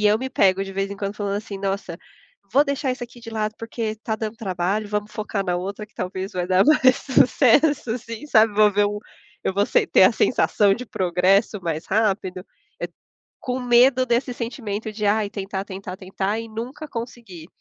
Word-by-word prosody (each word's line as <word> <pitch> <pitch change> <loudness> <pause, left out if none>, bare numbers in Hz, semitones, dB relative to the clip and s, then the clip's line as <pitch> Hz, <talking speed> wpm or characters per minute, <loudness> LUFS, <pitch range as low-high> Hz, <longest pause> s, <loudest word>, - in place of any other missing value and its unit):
e - - +7
eu 210 +1 +4
me 260 +1 -4
pego, 195 0 +3
de 195 - -8
vez 195 +1 -2
em 200 - -6
quando, 200 0 -4
falando 200 -1 -2
assim: 205 -2 -6
"Nossa, 195 -3 -3 0.5
vou 280 +4 +5
deixar 280 -2 -1
isso 250 -1 -5
aqui 240 0 -15
de 230 -1 -9
lado, 215 -1 -2
porque 225 -1 -4
tá 220 0 -3
dando 220 0 -4
trabalho, 195 0 -2
vamos 210 0 -2
focar 210 -2 -3
na 180 -1 0
outra 200 +4 -5
que - - -36
talvez 185 +1 -4
vai 180 -1 -2
dar 185 +1 +4
mais 260 -4 +5
sucesso 270 0 +3
assim, 230 +2 -6
sabe." 220 -6 +4
Vou 210 -1 +5
ver 205 +1 +3
um 205 0 -3 0.5
eu - - +1
vou 200 +1 +2
se - - +2
ter - - +5
a - - +7
sensação 200 -2 +3
de 250 +4 -4
progresso 190 +3 +1
mais 165 -1 -3
rápido, 190 -3 0 0.3
eh, - - -3 0.5
com 250 0 -3
medo 250 +1 +4
desse 245 +1 0
sentimento 225 -3 -4
de: 210 0 -4
"Ah, 215 +2 +3
tentar, 195 -1 -4
tentar, 190 -1 -7
tentar 195 +2 -3
e 230 0 -7
nunca 245 +7 -6
conseguir". 230 - -8
210 Hz, 200 wpm, -23 LUFS, 195-235 Hz, 0.5 s, e